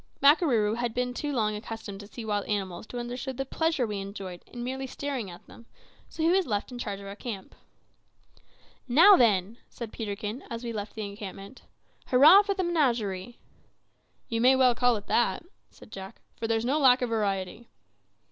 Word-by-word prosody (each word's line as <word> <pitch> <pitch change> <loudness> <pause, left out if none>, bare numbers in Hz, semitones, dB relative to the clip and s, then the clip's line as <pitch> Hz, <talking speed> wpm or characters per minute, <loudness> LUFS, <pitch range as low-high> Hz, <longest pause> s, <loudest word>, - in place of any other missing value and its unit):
Makarooroo 260 - +4
had 240 -2 -2
been 250 0 -1
too 295 +3 -3
long 215 -5 0
accustomed 210 -2 -7
to 205 - -10
see 225 +1 -8
wild 205 -2 -1
animals 195 -1 -3
to 245 - -7
understand 245 +2 -5
the 270 - -2
pleasure 320 -1 0
we 210 -2 -4
enjoyed 195 -2 -7
in 240 -1 -7
merely 265 +2 -4
staring 265 -6 -4
at 175 - -12
them, 230 - -16 0.4
so 320 - -4
he 325 - +4
was 375 -1 +2
left 205 +1 -2
in 245 - -7
charge 205 -4 -4
of 200 - -10
our 200 0 -7
camp. 210 -4 -7 1.3
"Now, 335 +11 +8
then," 215 - +2
said 235 -3 -8
Peterkin, 210 +3 -5
as 230 +1 -6
we 235 -1 -4
left 205 -1 -6
the 215 -1 -4
encampment, 200 +2 -9 0.5
"hurrah, 295 +10 +8
for 400 -1 -2
the 380 - -1
menagerie!" 240 - 0 0.9
"You 230 0 -1
may 255 +2 +6
well 255 -2 +5
call 245 0 +3
it 205 - -6
that," 240 - +1 0.2
said - - -17
Jack, 190 -1 -9 0.2
"for 225 - -4
there's 225 0 0
no 280 +5 +1
lack 255 -3 +5
of 245 - -1
variety." 205 0 -2
230 Hz, 185 wpm, -28 LUFS, 205-260 Hz, 1.3 s, Now